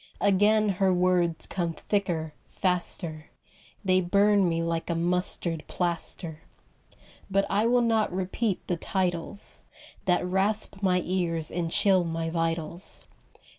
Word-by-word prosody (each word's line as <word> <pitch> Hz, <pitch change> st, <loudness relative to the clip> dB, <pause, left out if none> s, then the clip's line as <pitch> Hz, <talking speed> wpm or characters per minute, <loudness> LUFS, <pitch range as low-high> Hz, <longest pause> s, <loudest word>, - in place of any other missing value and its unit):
Again 205 Hz, +2 st, +4 dB
her 190 Hz, 0 st, +2 dB
words 180 Hz, -2 st, +2 dB
come 170 Hz, -3 st, -2 dB
thicker, 165 Hz, -4 st, -2 dB, 0.2 s
faster, 170 Hz, -3 st, -1 dB, 0.6 s
They 185 Hz, 0 st, +4 dB
burn 200 Hz, +1 st, +3 dB
me 165 Hz, 0 st, 0 dB
like 165 Hz, 0 st, -2 dB
a 170 Hz, -, 0 dB
mustard 170 Hz, -1 st, 0 dB
plaster. 170 Hz, -2 st, -2 dB, 0.9 s
But 195 Hz, 0 st, +2 dB
I 210 Hz, +3 st, +2 dB
will 245 Hz, 0 st, +3 dB
not 225 Hz, -2 st, +2 dB
repeat 190 Hz, +3 st, -2 dB
the 175 Hz, -, -1 dB
titles 180 Hz, +1 st, -2 dB, 0.4 s
That 180 Hz, -1 st, +2 dB
rasp 195 Hz, +2 st, 0 dB
my 180 Hz, -2 st, +2 dB
ears 170 Hz, -3 st, -1 dB
and 170 Hz, -1 st, -2 dB
chill 190 Hz, +1 st, +3 dB
my 165 Hz, -1 st, -3 dB
vitals. 165 Hz, +1 st, -2 dB
180 Hz, 125 wpm, -27 LUFS, 165-195 Hz, 0.9 s, Again